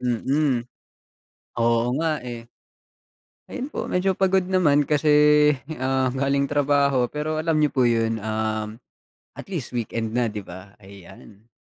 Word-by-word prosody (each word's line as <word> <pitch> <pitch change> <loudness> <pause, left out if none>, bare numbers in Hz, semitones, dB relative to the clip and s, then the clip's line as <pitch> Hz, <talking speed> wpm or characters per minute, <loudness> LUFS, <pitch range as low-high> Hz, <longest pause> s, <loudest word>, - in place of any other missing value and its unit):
Mm, 125 +1 0 0.9
oo 115 0 +2
nga, 160 -3 -1
eh. 120 -2 -8 1.0
Ayun 265 +3 -6
po - - -4
medyo 190 +1 +1
pagod 190 0 +1
naman 160 -6 +2
kasi, 150 +1 0 0.7
ah, 130 -1 0
galing 140 +1 0
trabaho 140 -3 +1
pero 155 +2 -3
alam 160 0 0
niyo 150 -1 +2
po 125 -2 +3
yun, 115 -1 0
um, 110 0 -3 0.6
at - - -11
least 160 -10 -5
weekend 115 -1 -3
na 120 -1 +1
'di 105 -2 -7
ba? 95 +2 -12
Ayan 100 +2 -16
130 Hz, 135 wpm, -23 LUFS, 115-150 Hz, 1.0 s, po